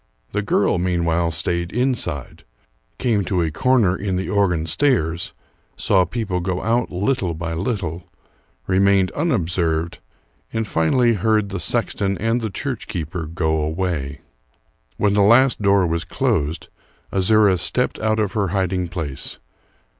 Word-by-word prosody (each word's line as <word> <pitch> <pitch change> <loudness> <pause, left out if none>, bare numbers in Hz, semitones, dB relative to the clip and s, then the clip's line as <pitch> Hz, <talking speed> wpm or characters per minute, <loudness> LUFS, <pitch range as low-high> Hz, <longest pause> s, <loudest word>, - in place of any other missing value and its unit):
The 105 - -1
girl 100 -2 +1
meanwhile 85 -2 +1
stayed 85 +1 -1
inside; 120 - -2 0.5
came 110 -5 +1
to 90 -3 0
a 80 - -1
corner 110 0 +2
in 95 -1 -2
the 95 +1 -2
organ 90 -6 +1
stairs; 85 - 0 0.4
saw 95 -1 +3
people 95 -1 -2
go 90 0 -2
out 115 +1 +1
little 95 -2 -1
by 85 0 -4
little; 90 -2 -3 0.6
remained 95 +1 +3
unobserved, 85 - -1 0.5
and 115 -1 -2
finally 115 +9 +2
heard 105 0 +1
the 95 -1 -4
sexton 100 +1 0
and 115 +2 0
the 110 - -2
church 95 - -4
keeper 85 0 -4
go 80 -1 0
away. 75 -3 -2 0.8
When 105 -1 +2
the 100 - +3
last 120 +4 +5
door 100 -2 +4
was 85 0 -1
closed, 75 -1 -1 0.4
Azouras 100 -1 +3
stepped 75 - 0
out 110 0 +1
of 105 -3 0
her 100 -1 0
hiding 95 -1 -1
place. 80 -6 -5
95 Hz, 140 wpm, -21 LUFS, 85-105 Hz, 0.8 s, last